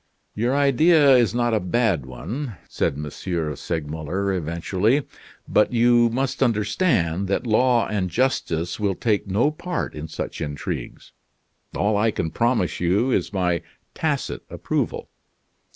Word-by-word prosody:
"Your 120 Hz, +5 st, 0 dB
idea 145 Hz, +1 st, +5 dB
is 120 Hz, -2 st, +3 dB
not 120 Hz, -1 st, +1 dB
a 110 Hz, -, +3 dB
bad 90 Hz, -, 0 dB
one," 115 Hz, -, -6 dB
said -, -, -1 dB
M. 75 Hz, +1 st, -5 dB, 0.5 s
Segmuller, 80 Hz, +6 st, -3 dB
eventually. 95 Hz, -, 0 dB, 0.4 s
"But 105 Hz, +4 st, +2 dB
you 120 Hz, 0 st, +4 dB
must 130 Hz, +3 st, -2 dB
understand 105 Hz, -, +1 dB
that 100 Hz, -, -1 dB
law 120 Hz, +1 st, +3 dB
and 100 Hz, -4 st, -1 dB
justice 90 Hz, -6 st, -1 dB
will 100 Hz, -3 st, 0 dB
take 105 Hz, -1 st, 0 dB
no 110 Hz, +10 st, +2 dB
part 175 Hz, +2 st, -4 dB
in 75 Hz, +1 st, -6 dB
such 80 Hz, -, -6 dB
intrigues. 75 Hz, -2 st, -5 dB, 0.7 s
All 105 Hz, +1 st, +1 dB
I 110 Hz, +2 st, +3 dB
can 80 Hz, -6 st, -2 dB
promise 115 Hz, -6 st, 0 dB
you 100 Hz, +9 st, +2 dB
is -, -, 0 dB
my 90 Hz, -4 st, 0 dB, 0.3 s
tacit -, -, -2 dB
approval. -, -, -2 dB
105 Hz, 135 wpm, -23 LUFS, 90-125 Hz, 0.7 s, idea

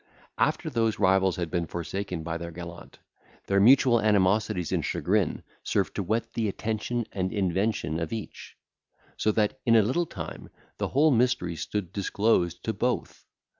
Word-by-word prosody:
After -, -, +1 dB
those 115 Hz, -2 st, +1 dB
rivals 95 Hz, -1 st, +3 dB
had 85 Hz, -2 st, -4 dB
been 85 Hz, -2 st, -1 dB
forsaken 90 Hz, 0 st, -4 dB
by 80 Hz, 0 st, -3 dB
their 85 Hz, 0 st, -6 dB
gallant, 85 Hz, +1 st, -10 dB, 0.5 s
their 100 Hz, 0 st, +2 dB
mutual 120 Hz, +1 st, +6 dB
animosities 100 Hz, -3 st, +2 dB
and -, -, 0 dB
chagrin 95 Hz, -2 st, 0 dB, 0.2 s
served -, -, 0 dB
to -, -, -2 dB
whet 115 Hz, +4 st, -2 dB
the 115 Hz, -2 st, 0 dB
attention 110 Hz, +3 st, -2 dB
and 95 Hz, -1 st, -2 dB
invention 95 Hz, -4 st, 0 dB
of 85 Hz, -2 st, -3 dB
each; 110 Hz, -2 st, -7 dB, 0.6 s
so 110 Hz, -, +1 dB
that 110 Hz, +4 st, 0 dB
in 115 Hz, -2 st, +4 dB
a 110 Hz, -, +6 dB
little 145 Hz, +11 st, 0 dB
time 85 Hz, -, -8 dB, 0.3 s
the -, -, 0 dB
whole 150 Hz, +3 st, +3 dB
mystery 120 Hz, -9 st, +1 dB
stood 90 Hz, +4 st, -4 dB
disclosed 100 Hz, -3 st, +1 dB
to 110 Hz, -, -1 dB
both. 120 Hz, +4 st, -2 dB
100 Hz, 160 wpm, -27 LUFS, 90-115 Hz, 0.6 s, mutual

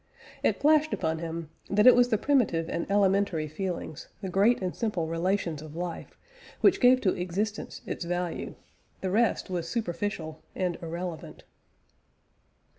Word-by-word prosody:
It -, -, +1 dB
flashed 310 Hz, +1 st, +4 dB
upon 160 Hz, -1 st, -1 dB
him 165 Hz, -1 st, -5 dB, 0.2 s
that 210 Hz, +1 st, +3 dB
it 255 Hz, -, +10 dB
was 245 Hz, 0 st, +4 dB
the 220 Hz, -, +3 dB
primitive 210 Hz, -, +2 dB
and 170 Hz, -, -3 dB
elementary 195 Hz, -5 st, +2 dB
feelings, 160 Hz, -1 st, -5 dB
the 190 Hz, -, -5 dB
great 200 Hz, +6 st, +3 dB
and 185 Hz, -2 st, -3 dB
simple 210 Hz, -8 st, -1 dB
relations 165 Hz, -1 st, -1 dB
of 155 Hz, 0 st, -10 dB
life, 175 Hz, 0 st, -5 dB, 0.4 s
which 385 Hz, -, +4 dB
gave 255 Hz, 0 st, +6 dB
to 185 Hz, -, +2 dB
existence 200 Hz, +5 st, -3 dB
its -, -, -4 dB
value. 175 Hz, 0 st, -3 dB, 0.5 s
The 190 Hz, -, -1 dB
rest 220 Hz, -2 st, +1 dB
was 170 Hz, -2 st, -2 dB
superficial 175 Hz, -6 st, -3 dB
and 180 Hz, -2 st, -1 dB
irrelevant. 170 Hz, 0 st, -6 dB
180 Hz, 145 wpm, -28 LUFS, 165-210 Hz, 0.5 s, it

